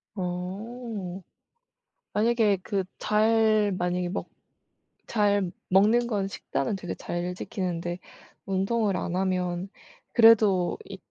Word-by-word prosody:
어. 190 +2 -5 0.9
만약에 220 -2 +3
그 195 -2 -1
잘 215 -1 +3
만약에 180 0 -1
먹 195 - -4 0.8
잘 205 -4 +2 0.2
먹는 215 +6 +4
건 200 -4 -1
식단은 200 +1 -3
되게 180 -2 -5
잘 175 +1 -4
지키는데 175 -2 -3 0.5
운동을 195 +1 0
안 175 - -3
하면 185 0 -1 0.4
그래도 215 -6 +5
이 195 - -8
195 Hz, 185 characters per minute, -27 LUFS, 180-215 Hz, 0.9 s, 그래도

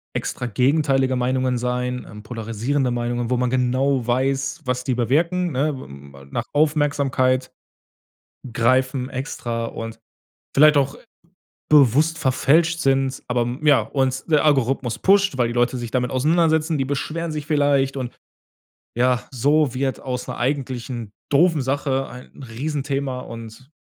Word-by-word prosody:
Extra 125 - -3
gegenteilige 135 +2 +2
Meinungen 130 0 0
sein, 125 +1 -2
ähm, 105 0 -10
polarisierende 115 +4 -2
Meinungen, 120 0 -2
wo 125 - +2
man 125 0 0
genau 130 0 +1
weiß, 135 +5 0
was 125 -1 -1
die 130 0 -1
bewirken, 165 - +1
ne? 70 - -4
Nach 115 - -2
Aufmerksamkeit 145 -4 +1 1.0
greifen 130 +2 +1
extra 120 -3 -4
und 115 0 -7 0.6
vielleicht 150 +1 +6
auch 140 0 +1 0.7
bewusst 150 +2 +4
verfälscht 160 +4 +2
sind. 135 -1 +1
Aber, 120 -1 +1 0.2
ja 145 -5 +5
und 130 +3 -1
der 150 -1 +4
Algorithmus 135 -4 +1
pusht, 195 -6 +3
weil 120 -2 +1
die 120 - -4
Leute 120 +1 +1
sich 120 -2 -5
damit 125 0 0
auseinandersetzen, 160 +3 +2
die 135 - +1
beschweren 160 +4 -3
sich 150 -1 -5
vielleicht. 145 -3 +2
Und, 125 -2 -5 0.8
ja, 125 0 +2
so 145 +2 +2
wird 135 0 -1
aus 125 -2 -4
'ner 125 - -5
eigentlichen 125 -4 -3 0.2
doofen 160 +1 +3
Sache 135 0 -1
ein 125 +3 -12
Riesenthema 135 +1 -3
und 115 +2 -10
130 Hz, 135 wpm, -22 LUFS, 125-145 Hz, 1.0 s, vielleicht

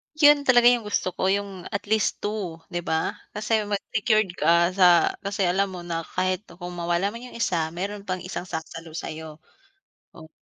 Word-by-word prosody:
'Yon 295 -2 +6
talaga 245 -2 +7
'yong 240 -3 +1
gusto 205 -2 0
ko - - -2
'yong 200 -3 -4
at 200 - -2
least 220 -1 +1
2, 195 -6 -4
'di 175 0 -3
ba? 160 0 -1 0.2
Kasi 215 0 0
mas 205 -1 -2
secured 215 -2 +2
ka 170 +2 +4
sa 180 -2 +5
kasi 200 0 -2
alam 195 +2 +2
mo 175 - -6
na 165 -1 -4
kahit 185 +2 -1
kung 175 0 -9
mawala 175 +3 0
man 230 +3 -9
'yong 250 - -10
isa, 170 -6 +1
mayro'n 200 +3 -5
pang 185 -1 -3
isang 180 0 -5
sasalo 165 -2 -7
sa'yo. 155 -1 -7 0.7
Oh 160 -2 -13
185 Hz, 185 wpm, -25 LUFS, 170-210 Hz, 0.7 s, talaga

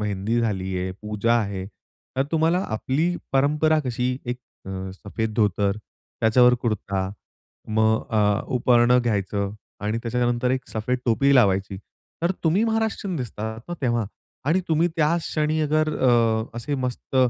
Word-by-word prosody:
मेहंदी 105 +3 -1
झाली 95 -4 -1
आहे, 95 +1 -2
पूजा 105 +2 +1
आहे, 100 -4 -1 0.5
तर 135 - +3
तुम्हाला 165 +2 +3
आपली 140 +10 0 0.2
परंपरा 150 +3 +3
कशी 125 +1 -1
एक 125 +1 -3 0.3
अ, 95 0 -5
सफेद 110 +3 -4
धोतर, 105 -2 +1 0.4
त्याच्यावर 125 +2 +5
कुर्ता, 100 -4 -1 0.6
मग 110 0 +2
अ, 105 -1 +2 0.2
उपरणं 120 0 +4
घ्यायचं 100 -3 -1 0.3
आणि 105 +2 -1
त्याच्यानंतर 120 +1 0
एक 130 0 -2
सफेद 120 +3 -2
टोपी 140 +4 +3
लावायची. 100 -5 +3 0.5
तर 170 - +2
तुम्ही 175 +7 +3
महाराष्ट्रीयन 220 -4 -1
दिसतात 110 -4 -5
ना, 175 - -3
तेव्हा 120 -4 +1 0.4
आणि 175 +5 +3
तुम्ही 165 +2 +3
त्याच 165 +2 +2
क्षणी 155 0 0
अगर 155 +1 +1
अ, 115 -3 +3
असे 140 +5 -3
मस्त 130 0 -3
120 Hz, 140 wpm, -24 LUFS, 105-140 Hz, 0.6 s, त्याच्यावर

